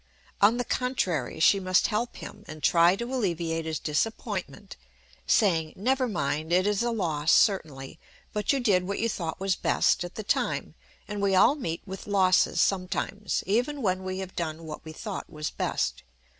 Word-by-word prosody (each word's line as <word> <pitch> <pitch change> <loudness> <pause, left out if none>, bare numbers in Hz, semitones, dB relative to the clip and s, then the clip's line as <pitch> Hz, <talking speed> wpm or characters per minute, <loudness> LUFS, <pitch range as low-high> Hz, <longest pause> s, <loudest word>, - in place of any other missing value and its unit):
On 215 +4 +5
the 245 - -1
contrary, 180 - -1
she 195 +5 +5
must 185 -1 +2
help 230 +2 -1
him, 210 - -10
and 155 -2 -10
try 170 +4 +5
to 235 +5 -5
alleviate 170 -8 -1
his 160 -1 -2
disappointment, 185 - -3 0.5
saying, 165 -8 +2
"Never 255 +5 +1
mind. 155 -5 -2
It 185 +2 +3
is 205 0 +1
a 240 - +1
loss, 165 -9 0
certainly. 155 -8 +1 0.3
But 210 0 0
you 275 - +1
did 190 -7 +2
what 200 - -2
you 230 - 0
thought 170 -7 -4
was 195 -1 +1
best - - +2
at 175 - -8
the 215 - -5
time, - - -1 0.3
and 210 -1 -4
we 195 -1 +2
all 185 - +6
meet 170 - -4
with 190 0 -8
losses 190 -2 +3
sometimes, 195 +2 0
even 250 +7 0
when 185 -2 0
we 185 0 -4
have 190 -1 -6
done 165 -1 -4
what 155 -1 -8
we 160 - -8
thought 200 +5 -6
was 150 -2 -4
best. - - -2
190 Hz, 180 wpm, -27 LUFS, 165-210 Hz, 0.5 s, all